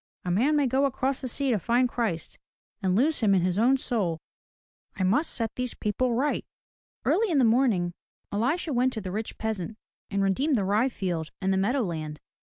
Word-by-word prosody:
A 180 - 0
man 255 +12 +3
may 290 -1 +3
go 265 +2 +2
across 265 0 -1
the 260 - -3
sea 270 +2 -1
to 220 - +2
find 240 +6 +2
Christ, 220 -10 -3 0.4
and 185 -2 +1
lose 285 +8 +2
him 205 -4 +4
in 180 - +2
his 185 +2 +1
own 255 +4 +4
soul. 205 -11 0 0.8
I 190 - -1
must 230 - +2
set 225 -2 -2
these 250 -1 -3
people 235 +3 0
right. 280 +5 0 0.3
'* - - -53
Early 445 0 +2
in 320 - +2
the 260 - +5
morning 220 -7 +2 0.4
Elisha 275 - 0
went 255 +1 +2
to 220 - -4
the 185 -2 -5
rich 215 +3 -4
peasant 220 -1 -3 0.3
and 200 -1 0
redeemed 265 +10 +2
the 200 -5 +1
rye 215 +7 +2
field 175 -9 -3
and 190 0 +1
the - - +1
meadow 240 +7 +1
land. 155 -5 -4
225 Hz, 205 wpm, -27 LUFS, 190-260 Hz, 0.8 s, the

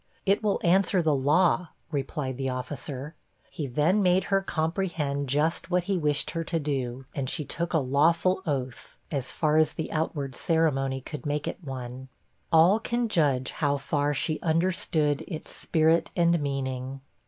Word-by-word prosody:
'It 200 +1 +3
will 210 -2 +1
answer 185 +2 +3
the 155 -2 +3
law,' 155 +6 +3 0.2
replied 135 -2 -2
the 135 +1 -2
officer. 135 +3 -5 0.4
He 150 - -4
then 155 +11 +2
made 185 0 +3
her 195 - +4
comprehend 160 -5 -1
just 155 +5 0
what 180 -1 +2
he 195 +2 -1
wished 150 -2 0
her 165 - -2
to 165 +1 -2
do, 135 -3 -3
and 135 -2 -2
she 150 0 -2
took 170 +4 -3
a 165 - +3
lawful 165 +7 +2
oath, 130 -3 -4
as 135 -4 -3
far 155 -1 +1
as 155 -1 +3
the 160 - -4
outward 145 -4 -2
ceremony 135 -5 +1
could 150 +3 -7
make 145 0 -1
it - - -5
one. 130 -1 -7 0.4
All 170 +6 +6
can 235 +1 -1
judge 140 -9 +2
how 145 -2 0
far 145 +1 0
she 155 +3 -1
understood 165 -3 +1
its 160 -4 -6
spirit 160 +1 +2
and 170 -1 +3
meaning. 135 -1 -3
150 Hz, 165 wpm, -27 LUFS, 135-170 Hz, 0.4 s, All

